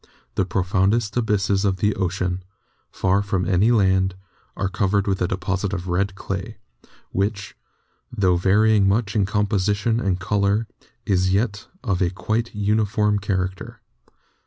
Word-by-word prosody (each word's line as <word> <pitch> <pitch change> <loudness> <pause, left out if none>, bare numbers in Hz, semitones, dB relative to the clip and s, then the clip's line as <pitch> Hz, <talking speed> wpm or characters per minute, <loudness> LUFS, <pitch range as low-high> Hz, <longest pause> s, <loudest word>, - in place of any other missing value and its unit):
The 95 - 0
profoundest 95 +4 +1
abysses 100 -4 +1
of 95 -2 +1
the 105 +2 +1
ocean, 90 -1 -2 0.5
far 95 +2 +1
from 95 -3 -1
any 95 +4 +3
land, 95 -4 +3 0.4
are 100 - 0
covered 95 +1 0
with 95 -2 -1
a 90 - +2
deposit 95 +1 -2
of 90 -1 -4
red 95 +2 0
clay, 95 -1 -5 0.5
which, 100 +1 -2 0.6
tho 95 -3 +2
varying 100 +3 +3
much 100 +1 0
in 100 -3 +2
composition 105 +2 +1
and 95 -5 0
color, 100 +3 +1 0.4
is 95 -3 +2
yet 100 0 -1 0.2
of 95 -7 -1
a 90 - +3
quite 110 +5 -2
uniform 105 0 +1
character. 95 -2 -3
100 Hz, 135 wpm, -22 LUFS, 95-105 Hz, 0.6 s, any